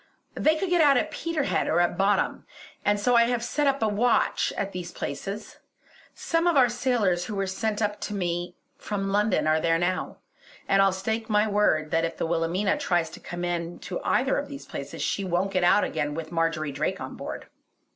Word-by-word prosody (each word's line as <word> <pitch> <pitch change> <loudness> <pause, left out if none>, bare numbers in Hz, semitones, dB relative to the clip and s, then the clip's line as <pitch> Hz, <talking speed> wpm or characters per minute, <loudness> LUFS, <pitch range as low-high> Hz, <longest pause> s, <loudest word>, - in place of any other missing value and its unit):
They 310 +1 +2
could 360 +3 -2
get 350 -2 +4
out 285 -3 +6
at 310 - 0
Peterhead 315 -3 -1
or 165 - +2
at 175 0 +2
Boddam, 195 +2 +1 0.4
and 205 0 +2
so 245 +4 +2
I 235 0 +6
have 240 -1 -1
set 275 0 +1
a - - +3
watch 225 +4 +2
at 200 0 -2
these 180 -2 -6
places. 200 +2 -6 0.6
Some 335 +1 0
of 340 -4 +3
our 250 -2 +6
sailors 230 -8 +1
who 210 - -5
were 195 0 0
sent 210 +3 -2
up 210 0 -2
to 210 - -4
me 175 -1 -2 0.2
from 195 -2 -3
London 210 0 +2
are 155 0 +3
there 165 0 +2
now, 180 +2 -2 0.5
and 195 - +4
I'll 195 0 +5
stake 220 +4 -3
my 210 0 +3
word 200 -7 +2
that 165 0 +2
if 165 0 -2
the - - -1
Wilhelmina 170 +4 0
tries 170 -3 0
to - - -10
come 175 0 -5
in 175 0 -3
to 180 - -5
either 265 +2 +1
of 285 - -5
these 280 -1 -9
places - - -6
she 200 - -1
won't 185 +1 0
get 185 -1 +1
out 195 +4 +5
again 150 -2 -2
with 160 0 -6
Marjory 165 -3 0
Drake 140 - -2
on - - -6
board. - - -7
195 Hz, 205 wpm, -26 LUFS, 175-235 Hz, 0.6 s, out